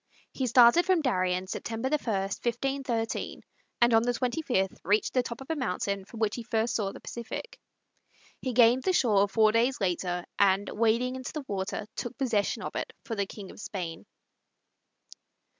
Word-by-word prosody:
He 260 - -1
started 240 +7 +7
from 365 -4 +3
Darien 185 -7 +1
September 225 +5 -3
1, - - -4
1513, 235 +4 -2 0.4
and 240 0 +5
on 225 - +6
the 245 +1 +1
25th 245 -6 -1
reached 210 +2 +1
the 255 - +3
top 235 0 -7
of 270 - -6
a - - 0
mountain 200 -6 -2
from 225 +3 -11
which 215 -2 +1
he - - -4
first 225 0 0
saw 200 -3 -1
the - - -10
Pacific. 240 - -7 0.8
He 255 - -2
gained 240 +1 +5
the 375 - +1
shore 205 - +4
four 215 +1 +4
days 240 +4 +2
later, 180 -2 -1
and, 200 0 +4
wading 230 +3 +1
into 255 - -6
the 305 -3 -5
water, 195 +1 -3
took 240 +1 -5
possession 235 -7 0
of - - -5
it - - -4
for 245 - -4
the 200 -2 -1
King 195 -2 -9
of - - -14
Spain. 170 -6 -6
230 Hz, 175 wpm, -28 LUFS, 200-250 Hz, 0.8 s, started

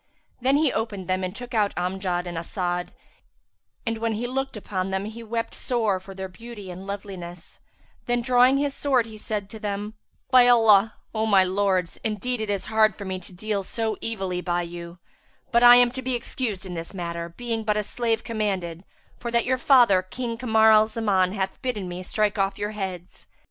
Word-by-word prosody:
Then 265 +3 +3
he 300 -3 +2
opened 205 -5 -3
them 185 0 0
and 185 +2 -3
took 245 +1 -8
out 210 -3 +1
Amjad 180 -1 -1
and 175 -1 -5
As'ad; 175 +1 -2 1.0
and 225 -1 -2
when 230 0 0
he 220 +3 -3
looked 270 0 -3
upon 190 -2 -3
them 190 +1 -2
he 220 +2 -7
wept 230 0 -3
sore 220 -6 0
for 190 +1 -11
their 190 0 -5
beauty 210 -1 -10
and 185 +2 -9
loveliness; 190 -4 -8 0.5
then 240 0 +1
drawing 250 +2 +5
his 285 0 0
sword 265 -5 +2
he 220 -1 -10
said 210 -2 -3
to 220 - -8
them, 210 0 -3 0.4
"By 250 -1 +7
Allah, 225 -3 +5 0.2
O 220 0 0
my 195 -3 +6
lords, 185 -2 0
indeed 220 +2 -2
it 215 - -3
is 200 -2 -1
hard 220 0 +3
for 200 - -8
me 190 -1 -3
to 185 - -11
deal 200 +2 -2
so 220 +3 -2
evilly 190 -5 -3
by 175 -1 0
you; 170 0 -8 0.5
but 235 - +4
I 245 0 +10
am 245 -1 +5
to 260 +1 -5
be 260 0 -1
excused 230 -4 -3
in 185 - -6
this 165 +3 -6
matter, 170 -1 -4
being 225 +5 -4
but 210 -1 +1
a 210 - 0
slave 230 +1 -1
commanded, 190 -7 -2 0.4
for 240 - -4
that 235 0 +1
your 255 0 +1
father 240 -9 +6
King 230 +5 -5
Kamar 220 -2 +4
al 215 0 +6
Zaman 200 -5 +1
hath 190 -2 -3
bidden 215 -7 -2
me 180 +1 -5
strike 210 +2 0
off 195 0 +1
your 205 +1 -2
heads." 185 -4 -6
210 Hz, 200 wpm, -25 LUFS, 185-235 Hz, 1.0 s, I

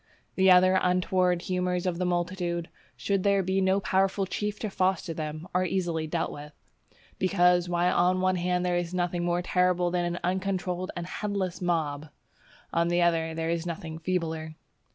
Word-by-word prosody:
The 190 0 +4
other 185 +1 +6
untoward 180 -1 +1
humours 180 -1 -1
of 180 -2 -1
the 180 - 0
multitude, 175 -1 -2 0.3
should 195 -1 0
there 200 0 +2
be 190 +1 0
no 190 +1 +3
powerful 195 +1 +1
chief 210 +2 -3
to 215 - -3
foster 185 -3 0
them, 155 +1 -5
are 180 +1 +2
easily 170 -3 -1
dealt 165 +1 -2
with; 150 +1 -9 0.7
because, 180 -2 +3
while 175 +1 +1
on 180 +1 +3
the 185 - -2
one 185 0 +2
hand 180 0 0
there 175 -1 +1
is 175 0 -3
nothing 175 -1 -1
more 175 0 0
terrible 180 -1 +2
than 175 -1 0
an 175 0 -2
uncontrolled 185 0 -2
and 175 - -4
headless 190 -2 -3
mob, 155 -4 -1 0.6
on 170 0 +2
the 175 0 +2
other, 165 -1 +1
there 165 0 -1
is 170 0 -2
nothing 165 -2 -5
feebler. 160 -3 -3
180 Hz, 175 wpm, -27 LUFS, 170-185 Hz, 0.7 s, other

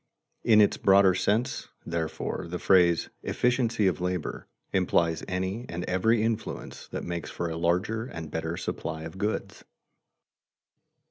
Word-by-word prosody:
In 110 -2 +6
its 105 - +3
broader 95 -1 +5
sense, 105 +6 0 0.2
therefore, 85 0 -3
the 90 - -3
phrase 90 -2 +4
"efficiency 120 -3 +1
of 90 -3 +1
labor" 90 -2 -3 0.3
implies 85 -3 +2
any 95 +6 -2
and 85 +1 -4
every 110 +5 +2
influence 110 -1 -3
that - - -5
makes 85 -1 -4
for 85 - -3
a - - -3
larger 90 +7 0
and 80 - -7
better 80 +2 -3
supply 80 -2 -4
of 80 +4 -8
goods. 105 +2 -3
90 Hz, 135 wpm, -28 LUFS, 85-110 Hz, 0.3 s, In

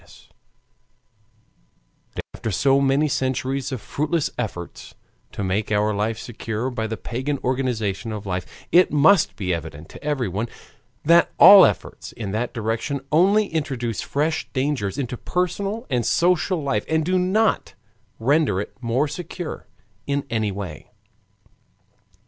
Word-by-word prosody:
Nowadays, - - -19 2.0
after 115 - -4
so 135 +7 +3
many 140 +3 +3
centuries 130 0 -1
of 130 -5 -4
fruitless 155 +5 -1
efforts 100 -8 -6 0.4
to - - -5
make 100 +3 -1
our 105 0 +2
life 110 +2 -1
secure 115 +1 -4
by 110 -3 -2
the 110 0 -4
pagan 130 +7 -3
organization 120 -5 -1
of 105 -1 -6
life, 90 -2 -3 0.2
it 180 +1 +6
must 155 +5 +4
be 90 -3 -2
evident 80 -1 -6
to - - -12
everyone 120 -8 -1 0.6
that 170 +2 +5
all 200 -2 +10
efforts - - -5
in 105 -4 -5
that 115 +4 -2
direction 115 +5 -2
only 195 +7 +4
introduce 130 -8 -2
fresh 155 +3 -1
dangers 130 -7 -1
into 125 -3 -3
personal 195 - -2
and 125 -3 0
social 175 - +1
life, 110 -7 0
and 160 -1 +1
do 185 +1 +2
not 205 +5 +1 0.4
render 135 -4 +2
it 105 - -5
more 125 +5 +1
secure 175 +2 -6 0.4
in 140 0 -1
any 110 -3 0
way. 95 -7 -7
130 Hz, 135 wpm, -23 LUFS, 110-155 Hz, 2.0 s, all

